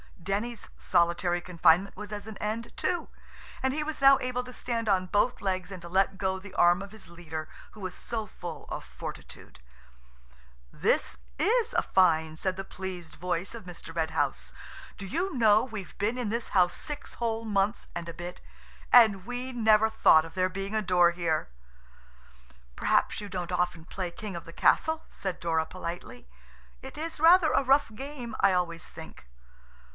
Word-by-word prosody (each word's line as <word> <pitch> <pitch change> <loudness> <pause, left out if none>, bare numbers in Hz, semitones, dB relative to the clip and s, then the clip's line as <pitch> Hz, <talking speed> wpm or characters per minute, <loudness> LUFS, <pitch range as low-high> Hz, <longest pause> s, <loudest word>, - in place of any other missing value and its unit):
Denny's 210 +5 -3
solitary 175 0 +1
confinement 175 +2 +3
was 210 +1 -8
at 205 -1 -5
an 220 -2 -8
end, 220 +2 -4
too–and 265 -6 -4
he 305 +1 -1
was 305 -1 -4
now 275 0 +8
able 250 0 -2
to 250 0 -10
stand 230 -2 -3
on 185 -2 +2
both 205 +6 +1
legs 185 -1 -2
and 185 -2 -7
to 170 - -9
let 195 +1 +2
go 190 -1 -1
the 190 0 -12
arm 175 +2 +5
of 200 0 -8
his 220 -2 -13
leader 160 -2 -7 0.2
who 215 - -13
was 185 -1 -4
so 225 -2 -4
full 175 -5 -8
of - - -5
fortitude. - - -9 1.1
"This - - +1 0.2
is 460 +4 +2
a - - +3
find," 160 -4 +2
said 185 -1 0
the 195 - -4
pleased 185 -3 -7
voice 180 +2 -3
of 230 -4 -9
Mr. 175 -2 -10
Red 160 -1 0
House - - -1 0.4
"Do 195 - -7
you 345 - -2
know, 220 -3 +5
we've 215 -7 -7
been 220 +5 0
in 245 -4 -2
this 230 +2 -2
house 180 -2 +3
six 295 -1 -7
whole 230 -1 -2
months 205 0 0
and 170 -1 -4
a 170 - -5
bit, 175 +2 -8 0.5
and 205 -6 +7
we 245 +2 -4
never 220 -2 +4
thought 160 -7 +5
of 165 - -11
there 185 0 +1
being 195 +2 -5
a 215 - +2
door 180 -3 +4
here." 170 - -1 1.3
"Perhaps 225 - +1
you 205 - -6
don't 180 -2 -4
often 180 -2 -1
play 185 0 -4
'King 200 +1 -7
of 170 - -7
the 165 - -11
Castle,'" 320 - +2
said 190 -2 -4
Dora 165 -2 0
politely; 170 - -7 0.5
"it - - -10
is 320 0 -5
rather 330 +1 +6
a - - +3
rough 270 -2 +3
game, 255 -1 -7
I 195 -1 +5
always 170 -2 -1
think." 160 - -11
195 Hz, 180 wpm, -28 LUFS, 175-230 Hz, 1.3 s, now